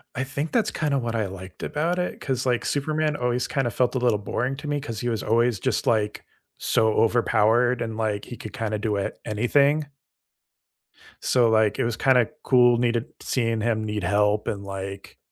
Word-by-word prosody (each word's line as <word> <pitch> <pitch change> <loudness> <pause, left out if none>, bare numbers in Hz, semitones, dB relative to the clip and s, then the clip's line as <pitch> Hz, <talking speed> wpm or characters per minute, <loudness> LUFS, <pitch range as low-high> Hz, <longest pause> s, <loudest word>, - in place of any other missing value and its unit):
I 130 - -1
think 140 +4 -4
that's 230 -3 +1
kinda 145 -4 0
what 115 -1 -3
I 110 -3 0
liked 95 0 -10
about 165 +4 -1
it, 180 - -3
'cause, 130 -2 -2
like, 125 -1 0
Superman 155 +1 0
always 125 -1 -1
kinda 135 -4 0
felt 125 +3 0
a - - +1
little 120 -4 +2
boring 125 +6 -2
to 150 +1 -7
me, 145 0 -1
'cause 115 -7 -5
he 120 - -1
was 110 -3 -1
always 115 -1 +2
just, - - -1
like, 105 -2 0 0.3
so 110 -1 +2
overpowered 115 +1 +3
and, 115 -1 -3
like, 105 -2 -1
he 120 - -8
could 110 - -8
kinda 110 -4 -2
do, 105 -1 -1
uh, 100 - -1
anything. 140 +7 +2 1.3
So, 120 -2 +3
like, 110 -2 +2
it - - +2
was 115 -1 -2
kinda 125 -2 +4 0.2
cool 120 -2 +5
needed 120 -1 +1
seeing 115 -3 -1
him 110 -1 0
need 105 -2 -3
help 105 +3 +1
and, 100 -1 -3
like, 100 0 -7
120 Hz, 190 wpm, -24 LUFS, 110-130 Hz, 1.3 s, cool